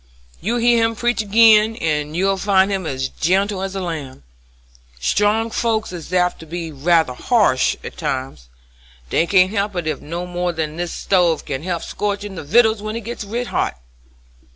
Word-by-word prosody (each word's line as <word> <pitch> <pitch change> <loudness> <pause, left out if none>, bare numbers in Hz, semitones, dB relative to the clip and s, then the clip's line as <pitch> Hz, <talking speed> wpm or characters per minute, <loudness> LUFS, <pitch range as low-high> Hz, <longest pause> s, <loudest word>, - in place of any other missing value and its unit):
You 230 +6 -1
hear 235 -1 +3
him 225 0 0
preach 240 +1 0
agin 220 +1 +5
and 150 -3 -2
you'll 195 +2 +2
find 195 0 +3
him 190 -4 -2
as 130 -2 -2
gentle 190 +6 0
as 195 0 -4
a - - -2
lamb. 150 - -6 0.8
Strong 210 - +1
folks 220 -3 -1
is 175 -1 -8
apt 180 -1 +1
to 160 - -11
be 165 0 -5
ruther 160 -1 +2
ha'sh 165 - +2
at - - -8
times; 130 - -4 0.6
they 170 - +2
can't 185 0 +4
help 205 -2 -1
it 155 -5 -2
no 170 +3 -5
more 175 0 -2
than 160 -1 -3
this 175 -1 -3
stove 175 -5 +1
can 135 -1 -4
help 175 0 -3
scorchin' 205 -1 -3
the 170 - -6
vittles 220 +7 +3
when 215 +1 -4
it 230 - -4
gits 230 +1 -6
red 235 +5 -3
hot. 65 - -1
185 Hz, 175 wpm, -20 LUFS, 160-215 Hz, 0.8 s, agin